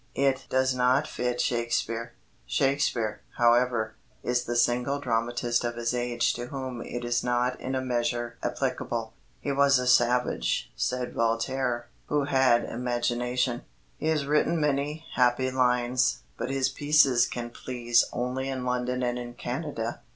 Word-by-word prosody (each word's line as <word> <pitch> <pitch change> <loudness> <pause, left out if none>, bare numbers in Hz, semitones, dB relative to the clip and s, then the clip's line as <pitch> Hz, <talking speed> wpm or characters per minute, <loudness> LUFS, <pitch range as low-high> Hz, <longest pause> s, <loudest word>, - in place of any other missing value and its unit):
It 135 -1 +1
does 130 0 +2
not 125 +3 +3
fit 125 0 -2
Shakespeare. 120 -1 -1 0.3
Shakespeare, 125 - 0 0.2
however, 120 -2 +3 0.3
is 125 0 0
the 120 - -2
single 125 +3 +2
dramatist 120 -1 0
of 120 0 -2
his 115 0 -1
age 120 -1 0
to 120 0 -5
whom 130 -3 -5
it 120 0 -5
is 120 0 0
not 125 +1 0
in 130 +1 -3
a 130 - 0
measure 120 -1 -1
applicable. - - -2 0.3
"He - - -2
was 140 0 +4
a 125 - -1
savage," 125 0 +2
said 125 0 -2
Voltaire, 120 +1 0 0.2
"who 145 -1 +1
had 130 -4 +3
imagination. 120 0 -1 0.4
He 155 - -2
has 155 -3 +1
written 150 +3 +2
many 150 +2 -1
happy 125 +1 +2
lines; 125 - +1
but - - -4
his 135 -1 +1
pieces 140 -4 +4
can 120 -1 -5
please 120 -1 +1
only 130 +2 -2
in 130 -2 -3
London 125 0 -1
and 120 0 -1
in 120 0 -7
Canada." 125 -3 -4
125 Hz, 145 wpm, -27 LUFS, 120-130 Hz, 0.4 s, was